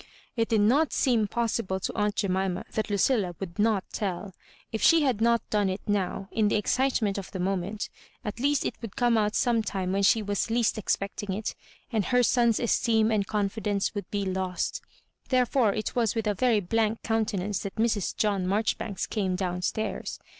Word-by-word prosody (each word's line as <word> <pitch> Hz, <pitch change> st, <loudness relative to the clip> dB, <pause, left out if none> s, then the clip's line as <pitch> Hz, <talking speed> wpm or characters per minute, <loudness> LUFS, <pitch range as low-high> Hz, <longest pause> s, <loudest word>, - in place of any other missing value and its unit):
It 230 Hz, -1 st, +1 dB
did 220 Hz, -3 st, +3 dB
not 275 Hz, +9 st, +3 dB
seem 230 Hz, -5 st, +2 dB
possible 225 Hz, -4 st, -1 dB
to -, -, -3 dB
aunt 210 Hz, -1 st, 0 dB
Jemima 190 Hz, -1 st, -1 dB
that 215 Hz, -, -2 dB
Ludlla 200 Hz, -3 st, +1 dB
would 185 Hz, 0 st, -7 dB
not 210 Hz, -3 st, +2 dB
telL 190 Hz, -1 st, -3 dB, 0.4 s
If 220 Hz, -, -3 dB
she 330 Hz, -2 st, +6 dB
had 250 Hz, -6 st, +1 dB
not 235 Hz, 0 st, +2 dB
done 205 Hz, -2 st, +2 dB
it 190 Hz, +2 st, -3 dB
now, 195 Hz, -1 st, -1 dB
in 220 Hz, -2 st, +2 dB
the 210 Hz, -, +2 dB
ezdtement 220 Hz, -3 st, +1 dB
of 195 Hz, -, -8 dB
the 190 Hz, -, -6 dB
moment, 195 Hz, +3 st, -2 dB, 0.4 s
at 210 Hz, +2 st, -4 dB
least 285 Hz, +2 st, +1 dB
it -, -, -1 dB
would 230 Hz, -4 st, -7 dB
come 240 Hz, -2 st, +3 dB
out 210 Hz, -1 st, +1 dB
some 235 Hz, -2 st, +2 dB
time 190 Hz, -3 st, -2 dB
when 200 Hz, -, +1 dB
she 215 Hz, +2 st, +4 dB
was 205 Hz, +2 st, -1 dB
least 230 Hz, -1 st, +1 dB
expecting 200 Hz, 0 st, -2 dB
it, 210 Hz, +3 st, -3 dB, 0.4 s
and 215 Hz, -5 st, 0 dB
her 250 Hz, -1 st, +3 dB
son's 235 Hz, -2 st, +3 dB
esteem 225 Hz, -2 st, +2 dB
and 205 Hz, -3 st, +1 dB
confi 210 Hz, +1 st, -1 dB
dence 200 Hz, -2 st, 0 dB
would 205 Hz, -1 st, -5 dB
be 200 Hz, -1 st, -2 dB
lost 185 Hz, -2 st, -2 dB, 0.5 s
Therefore 250 Hz, -3 st, +3 dB
it 215 Hz, +2 st, -3 dB
was 235 Hz, -3 st, +1 dB
with 225 Hz, -1 st, -1 dB
a 210 Hz, -, +2 dB
very 230 Hz, 0 st, +2 dB
blank 220 Hz, +3 st, 0 dB
countenance 210 Hz, -3 st, -1 dB
that 200 Hz, -, -6 dB
Mrs. 220 Hz, -4 st, 0 dB
John 200 Hz, -4 st, +1 dB
Maijo 205 Hz, +3 st, +1 dB
ribanks 200 Hz, -4 st, -3 dB
came 190 Hz, -4 st, -1 dB
down 180 Hz, -1 st, -2 dB
stairs. 220 Hz, +4 st, -2 dB
210 Hz, 195 wpm, -27 LUFS, 195-230 Hz, 0.5 s, she